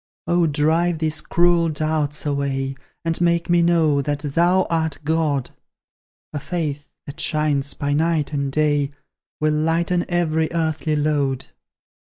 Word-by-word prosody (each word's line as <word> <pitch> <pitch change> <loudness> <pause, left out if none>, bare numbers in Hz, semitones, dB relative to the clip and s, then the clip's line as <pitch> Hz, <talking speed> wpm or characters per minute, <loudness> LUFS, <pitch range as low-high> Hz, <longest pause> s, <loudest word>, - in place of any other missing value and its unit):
Oh, 175 0 +2
drive 160 +3 +1
these 155 -1 -1
cruel 170 -1 +2
doubts 155 -1 -1
away; 140 -2 -1 0.3
And 165 +1 -1
make 170 0 +2
me 175 0 +5
know, 165 -4 +3
that 145 +1 -2
Thou 170 +6 +2
art 160 -2 -1
God! 150 -4 0 0.8
A 145 - -2
faith, 150 -3 -4 0.2
that 140 - -9
shines 150 -3 0
by 145 0 -1
night 155 -1 +1
and 140 -1 -1
day, 145 -1 +1 0.5
Will 155 0 +2
lighten 165 +3 +1
every 160 -2 +1
earthly 160 -1 0
load. 145 -3 0
155 Hz, 135 wpm, -21 LUFS, 145-170 Hz, 0.8 s, me